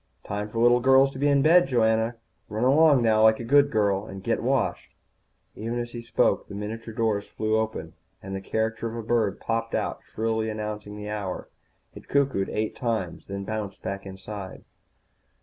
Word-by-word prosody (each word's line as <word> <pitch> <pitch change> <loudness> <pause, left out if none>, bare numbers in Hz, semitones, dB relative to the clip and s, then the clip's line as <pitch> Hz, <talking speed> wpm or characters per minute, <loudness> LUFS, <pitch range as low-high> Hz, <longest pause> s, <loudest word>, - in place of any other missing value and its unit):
"Time 105 +1 -4
for 115 - -7
little 120 +1 +5
girls 135 +2 +5
to 130 - -9
be 145 - +2
in 140 -1 +4
bed, 170 +1 +6
Joanna. 115 -2 +2 0.3
Run 110 +2 -2
along 140 0 +5
now 110 -1 +4
like 110 0 +5
a - - -4
good 140 +4 +4
girl, 105 -3 +1
and 95 0 -8
get - - 0
washed." - - -1 0.6
Even 115 +3 -3
as 120 0 -4
he 120 - -6
spoke 115 - +1
the 100 - -8
miniature 110 +3 -5
doors 110 -2 0
flew 110 0 -1
open 110 -8 -2 0.3
and 95 0 -6
the 95 - -4
caricature 110 +3 -2
of 115 - -7
a 115 - -4
bird 110 -5 +1
popped 115 0 -2
out, - - -2
shrilly 110 0 -2
announcing 105 -1 -5
the 105 0 -6
hour. 100 -3 -4 0.4
It - - -12
cuckooed 135 -9 +1
eight 110 0 -2
times, 110 -8 -3
then 100 0 -5
bounced 105 -1 -5
back 100 0 -4
inside. 95 0 -8
110 Hz, 185 wpm, -26 LUFS, 105-120 Hz, 0.6 s, bed